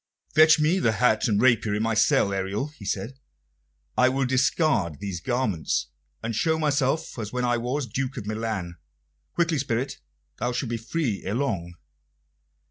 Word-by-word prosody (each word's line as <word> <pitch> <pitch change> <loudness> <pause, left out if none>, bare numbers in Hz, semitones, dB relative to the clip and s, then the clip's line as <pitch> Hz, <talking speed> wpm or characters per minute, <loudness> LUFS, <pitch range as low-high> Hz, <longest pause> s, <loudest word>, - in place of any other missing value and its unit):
"Fetch 155 0 +7
me 160 +5 +3
the 115 -9 +2
hat 110 -1 +2
and 105 -3 +2
rapier 115 -3 +3
in 105 - 0
my 115 0 +1
cell, 105 -2 +3
Ariel," 95 +8 -2
he 150 -9 -13
said. 110 +7 -3 0.8
"I 125 0 +5
will 135 +1 0
discard 130 - +1
these 95 -4 -5
garments, 115 -8 -1 0.3
and 115 0 -2
show 160 +8 +1
myself 150 -1 0
as 105 -2 -4
when 125 0 -1
I 120 0 +2
was 125 +4 -2
Duke 130 +3 -3
of - - -5
Milan. 105 -5 -3 0.6
Quickly, 170 -3 +1
spirit! 130 0 -2 0.4
Thou 125 0 -1
shalt 120 -1 -2
be 120 - -1
free 120 -2 -2
ere 100 +3 -2
long." 95 -11 -2
120 Hz, 165 wpm, -25 LUFS, 105-135 Hz, 0.8 s, Fetch